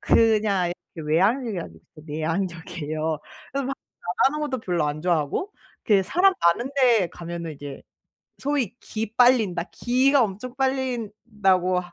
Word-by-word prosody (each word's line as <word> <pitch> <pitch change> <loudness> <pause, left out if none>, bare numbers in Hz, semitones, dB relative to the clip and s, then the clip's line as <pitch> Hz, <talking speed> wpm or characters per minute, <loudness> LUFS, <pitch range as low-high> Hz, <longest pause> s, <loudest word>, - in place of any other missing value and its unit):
그냥 210 -6 +3 0.2
이렇게 155 -2 -7
외향형이 210 - +2
아니고 80 - -8 0.3
내향적이에요. 160 -1 -3 0.3
그래서 275 -1 -1
막 270 - -2 0.3
말하는 265 +12 +1
것도 260 -3 -3
별로 175 -6 0
안 150 +1 -3
좋아하고 175 - 0 0.3
그 200 -3 +4
사람 365 - +4
많은 205 +10 +2
데 230 -8 +4
가면은 170 -1 -6
이제 145 -1 -9 0.6
소위 270 -6 -1
"기 220 0 -5
빨린다. 225 -9 +4
기가 260 +2 +3
엄청 220 +5 -4
빨린다."고 215 -8 0
하 175 -1 -12
195 Hz, 300 characters per minute, -24 LUFS, 170-250 Hz, 0.6 s, 그